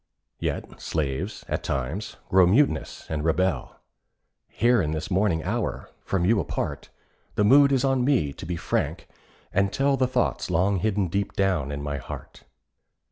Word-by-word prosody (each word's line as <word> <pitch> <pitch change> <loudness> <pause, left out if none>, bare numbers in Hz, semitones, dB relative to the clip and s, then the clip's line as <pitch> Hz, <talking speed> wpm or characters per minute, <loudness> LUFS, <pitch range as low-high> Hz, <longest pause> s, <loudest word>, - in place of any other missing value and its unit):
Yet - - -4
slaves, 70 -4 -3
at - - -2
times, 75 - -3
grow 95 -1 +6
mutinous 130 +11 +1
and 75 -2 -3
rebel. 80 -4 0 0.7
Here 120 -1 +3
in 75 -3 -1
this 80 +4 -4
morning 90 -4 +2
hour, - - -3
from 95 -3 0
you 105 +2 +4
apart, 85 - -3 0.5
The 105 - +2
mood 140 +6 +6
is 135 -1 +2
on 135 -2 +2
me 125 - +2
to 85 - -9
be 90 - -2
frank 85 - -2 0.5
and 95 +1 +2
tell 135 +2 +2
The 130 -1 +2
thoughts 130 - 0
long 95 +3 +2
hidden 100 -1 +1
deep 100 +3 -2
down 90 -8 0
in 70 0 -4
my 70 -1 -3
heart. 65 - -9
95 Hz, 160 wpm, -25 LUFS, 80-110 Hz, 0.7 s, grow